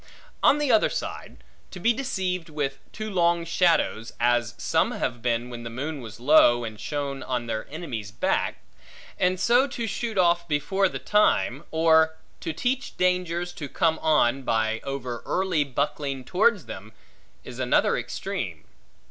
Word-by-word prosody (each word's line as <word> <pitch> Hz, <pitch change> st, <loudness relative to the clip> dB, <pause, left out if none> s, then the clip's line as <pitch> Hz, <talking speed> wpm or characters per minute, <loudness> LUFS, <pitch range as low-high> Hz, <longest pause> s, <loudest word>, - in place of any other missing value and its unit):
On 285 Hz, -, +5 dB
the 295 Hz, -3 st, +1 dB
other 220 Hz, -, +4 dB
side, -, -, -6 dB, 0.3 s
to 185 Hz, -, -9 dB
be 230 Hz, +6 st, +3 dB
deceived 185 Hz, -9 st, -2 dB
with 140 Hz, -3 st, -3 dB
too 215 Hz, 0 st, -5 dB
long 170 Hz, -2 st, +2 dB
shadows 170 Hz, -9 st, +1 dB
(as 120 Hz, 0 st, +2 dB
some -, -, +1 dB
have 120 Hz, -1 st, -3 dB
been, 120 Hz, 0 st, -1 dB
when 120 Hz, -1 st, -7 dB
the 115 Hz, -, -6 dB
moon 140 Hz, +5 st, -4 dB
was 115 Hz, -1 st, -10 dB
low, 120 Hz, -3 st, +5 dB
and 110 Hz, -2 st, -6 dB
shone 140 Hz, +4 st, -3 dB
on 125 Hz, -2 st, -2 dB
their 110 Hz, -2 st, -4 dB
enemies' 140 Hz, -, -5 dB
back), 105 Hz, -, -1 dB, 0.6 s
and 180 Hz, 0 st, +2 dB
so 245 Hz, +6 st, +4 dB
to 240 Hz, -3 st, -4 dB
shoot 225 Hz, 0 st, -3 dB
off 170 Hz, -1 st, +3 dB
before 190 Hz, +6 st, +1 dB
the -, -, -5 dB
time; 170 Hz, -, +2 dB
or 160 Hz, 0 st, +4 dB, 0.2 s
to -, -, -3 dB
teach 250 Hz, -, -2 dB
dangers 180 Hz, -1 st, 0 dB
to 145 Hz, -3 st, -7 dB
come 160 Hz, 0 st, +1 dB
on, 135 Hz, -4 st, +3 dB
by 110 Hz, -3 st, 0 dB
over 130 Hz, -4 st, -4 dB
early 185 Hz, -5 st, +1 dB
buckling 140 Hz, 0 st, -2 dB
towards 200 Hz, 0 st, +2 dB
them; 105 Hz, +3 st, -9 dB, 0.5 s
is -, -, -9 dB
another -, -, +2 dB
extreme. -, -, -4 dB
155 Hz, 155 wpm, -25 LUFS, 120-180 Hz, 0.6 s, On